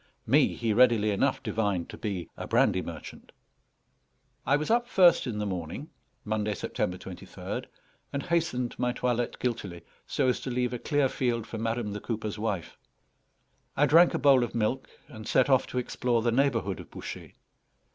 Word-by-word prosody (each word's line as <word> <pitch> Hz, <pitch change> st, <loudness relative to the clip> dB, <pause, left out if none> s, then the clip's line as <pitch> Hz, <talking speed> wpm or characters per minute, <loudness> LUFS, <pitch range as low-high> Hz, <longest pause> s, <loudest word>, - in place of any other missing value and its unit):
Me -, -, +3 dB
he 115 Hz, -2 st, 0 dB
readily 115 Hz, -3 st, +4 dB
enough 100 Hz, -, 0 dB
divined 100 Hz, -6 st, -1 dB
to -, -, -9 dB
be 95 Hz, -6 st, -4 dB
a -, -, -6 dB
brandy -, -, +3 dB
merchant. -, -, -9 dB, 1.2 s
I 140 Hz, -, +5 dB
was 150 Hz, +7 st, -1 dB
up 240 Hz, +1 st, +2 dB
first 180 Hz, -, +5 dB
in 115 Hz, -4 st, -3 dB
the 105 Hz, -, -2 dB
morning 95 Hz, -, -5 dB, 0.3 s
(Monday, 105 Hz, -1 st, -1 dB
September 90 Hz, -, -2 dB
23rd), 90 Hz, -1 st, -7 dB, 0.5 s
and 140 Hz, -, -3 dB
hastened 160 Hz, -8 st, 0 dB
my 125 Hz, 0 st, +1 dB
toilette 120 Hz, -1 st, -1 dB
guiltily, 100 Hz, -9 st, -3 dB, 0.2 s
so 135 Hz, -, +1 dB
as 125 Hz, -, +1 dB
to -, -, -5 dB
leave 125 Hz, 0 st, -1 dB
a 120 Hz, -, -3 dB
clear 145 Hz, 0 st, +2 dB
field 120 Hz, -3 st, -1 dB
for 115 Hz, 0 st, -6 dB
madam, 115 Hz, -2 st, -2 dB
the 105 Hz, -, -4 dB
cooper's 110 Hz, -2 st, -4 dB
wife. 105 Hz, -6 st, -3 dB, 1.0 s
I 145 Hz, -, +5 dB
drank 165 Hz, +5 st, +6 dB
a -, -, +2 dB
bowl 135 Hz, -3 st, +5 dB
of 120 Hz, -, -4 dB
milk, 115 Hz, +4 st, -1 dB, 0.2 s
and 110 Hz, -2 st, -10 dB
set 130 Hz, +3 st, +3 dB
off 130 Hz, -, +4 dB
to -, -, -6 dB
explore 120 Hz, -1 st, 0 dB
the 120 Hz, -, +2 dB
neighbourhood 115 Hz, -7 st, +1 dB
of -, -, -10 dB
Bouchet. -, -, -8 dB
120 Hz, 175 wpm, -28 LUFS, 105-130 Hz, 1.2 s, drank